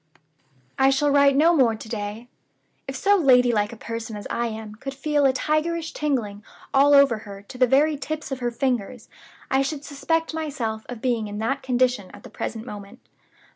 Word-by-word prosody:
"I 265 Hz, 0 st, +5 dB
shall 285 Hz, +2 st, +2 dB
write 280 Hz, -1 st, +5 dB
no 330 Hz, +4 st, +5 dB
more 245 Hz, -6 st, +3 dB
to 220 Hz, -, -10 dB
day. 215 Hz, +1 st, -5 dB, 0.6 s
If 270 Hz, -, -5 dB
so 405 Hz, +8 st, +3 dB
lady 250 Hz, -7 st, +5 dB
like 210 Hz, -1 st, 0 dB
a 235 Hz, -, -10 dB
person 230 Hz, 0 st, -6 dB
as 205 Hz, -, -8 dB
I 235 Hz, 0 st, -1 dB
am 220 Hz, -1 st, -7 dB
could 270 Hz, +5 st, -7 dB
feel 290 Hz, 0 st, +2 dB
a -, -, +4 dB
tigerish 315 Hz, +4 st, -1 dB
tingling 230 Hz, -9 st, -2 dB, 0.3 s
all 285 Hz, +1 st, +6 dB
over 275 Hz, -6 st, +5 dB
her 200 Hz, -2 st, -10 dB
to 225 Hz, -, -12 dB
the 255 Hz, -, +5 dB
very 290 Hz, +4 st, +3 dB
tips 310 Hz, +1 st, -5 dB
of 265 Hz, -, -3 dB
her 245 Hz, -1 st, -1 dB
fingers, 245 Hz, -2 st, -2 dB, 0.4 s
I 265 Hz, 0 st, +3 dB
should 280 Hz, +1 st, -3 dB
suspect 325 Hz, +3 st, -1 dB
myself 265 Hz, -9 st, -4 dB
of 245 Hz, -3 st, -8 dB
being 235 Hz, -4 st, 0 dB
in 205 Hz, 0 st, -6 dB
that 270 Hz, +6 st, -1 dB
condition 250 Hz, -6 st, 0 dB
at -, -, -15 dB
the -, -, -12 dB
present 225 Hz, 0 st, -5 dB
moment. 205 Hz, 0 st, -9 dB
255 Hz, 195 wpm, -24 LUFS, 220-285 Hz, 0.6 s, all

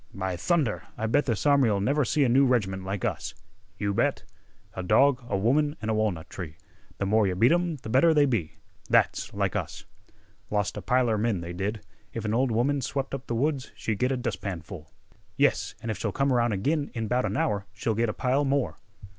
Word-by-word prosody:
"By 95 Hz, -2 st, -2 dB
thunder, 135 Hz, -, 0 dB
I 110 Hz, -, -2 dB
bet 145 Hz, +7 st, +2 dB
this 115 Hz, 0 st, -1 dB
army'll 135 Hz, -8 st, +4 dB
never 140 Hz, +9 st, +2 dB
see 145 Hz, +4 st, +2 dB
another 120 Hz, -3 st, +3 dB
new 140 Hz, -, +5 dB
reg'ment 95 Hz, -7 st, 0 dB
like 95 Hz, 0 st, -3 dB
us!" -, -, -3 dB, 0.4 s
"You 100 Hz, -1 st, -1 dB
bet!" -, -, 0 dB, 0.5 s
"A 95 Hz, -, -4 dB
dog, 125 Hz, +7 st, +3 dB
a 100 Hz, -, +1 dB
woman, 145 Hz, +9 st, +2 dB
an' 110 Hz, -, -4 dB
a -, -, +2 dB
walnut 105 Hz, -7 st, -1 dB
tree 80 Hz, -5 st, -8 dB, 0.4 s
Th' 100 Hz, -, 0 dB
more 105 Hz, +1 st, +3 dB
yeh 90 Hz, -, -1 dB
beat 115 Hz, +7 st, +4 dB
'em, 175 Hz, -2 st, +1 dB
th' 110 Hz, -4 st, -8 dB
better 150 Hz, +7 st, +5 dB
they 150 Hz, -2 st, +5 dB
be! 85 Hz, -, -2 dB, 0.3 s
That's -, -, +2 dB
like -, -, -1 dB
us." -, -, -4 dB, 0.6 s
"Lost 105 Hz, -1 st, -1 dB
a -, -, -5 dB
piler 125 Hz, -4 st, +2 dB
men, 110 Hz, -5 st, 0 dB
they 85 Hz, +1 st, -6 dB
did. 100 Hz, +3 st, -3 dB, 0.3 s
If 115 Hz, -1 st, -4 dB
an 105 Hz, -, 0 dB
ol' 130 Hz, +4 st, +2 dB
woman 130 Hz, +5 st, +1 dB
swep' 135 Hz, +2 st, -3 dB
up 135 Hz, -1 st, -5 dB
th' 120 Hz, -, -2 dB
woods 140 Hz, +2 st, -1 dB
she'd 110 Hz, -3 st, -3 dB
git 125 Hz, +1 st, +2 dB
a 130 Hz, -, 0 dB
dustpanful." 90 Hz, -, -5 dB, 0.5 s
"Yes, -, -, +2 dB
an' 115 Hz, -, -2 dB
if 100 Hz, -, -5 dB
she'll -, -, -1 dB
come 135 Hz, -1 st, +1 dB
around 120 Hz, -2 st, +2 dB
ag'in 145 Hz, +9 st, 0 dB
in 115 Hz, -2 st, -2 dB
'bout 125 Hz, +3 st, +1 dB
an -, -, -2 dB
hour 105 Hz, -11 st, 0 dB
she'll 110 Hz, +3 st, -2 dB
get 115 Hz, +1 st, +1 dB
a -, -, -2 dB
pile 130 Hz, +3 st, +1 dB
more." 140 Hz, -1 st, 0 dB
115 Hz, 215 wpm, -27 LUFS, 100-135 Hz, 0.6 s, new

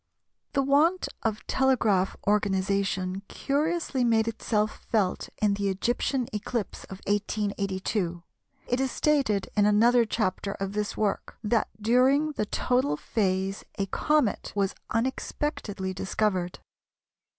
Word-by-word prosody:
The 275 Hz, -, +2 dB
want 305 Hz, +7 st, +3 dB
of 220 Hz, -1 st, -2 dB
telegraph 225 Hz, -8 st, +2 dB
organisation 195 Hz, -2 st, +1 dB
curiously 295 Hz, -2 st, 0 dB
made 225 Hz, -2 st, +3 dB
itself 215 Hz, -1 st, -1 dB
felt 205 Hz, -5 st, 0 dB
in 210 Hz, -1 st, +3 dB
the 200 Hz, 0 st, 0 dB
Egyptian 240 Hz, +5 st, 0 dB
eclipse 215 Hz, 0 st, -3 dB
of 190 Hz, 0 st, -10 dB
1882. 200 Hz, -3 st, -1 dB, 0.4 s
It 245 Hz, -, 0 dB
is 265 Hz, -, +1 dB
stated 270 Hz, -10 st, +1 dB
in 205 Hz, -1 st, +4 dB
another 230 Hz, +3 st, +5 dB
chapter 200 Hz, -2 st, -1 dB
of 195 Hz, 0 st, -4 dB
this 210 Hz, 0 st, -2 dB
work 210 Hz, -2 st, -1 dB
that 220 Hz, +1 st, +1 dB
during 260 Hz, +7 st, +3 dB
the 215 Hz, -8 st, -2 dB
total 245 Hz, -, +1 dB
phase 195 Hz, -1 st, -1 dB
a 195 Hz, -, 0 dB
comet 295 Hz, +3 st, +1 dB
was 200 Hz, -1 st, +1 dB, 0.2 s
unexpectedly 230 Hz, -5 st, -2 dB
discovered. 190 Hz, -1 st, -1 dB
210 Hz, 115 wpm, -27 LUFS, 195-245 Hz, 0.4 s, another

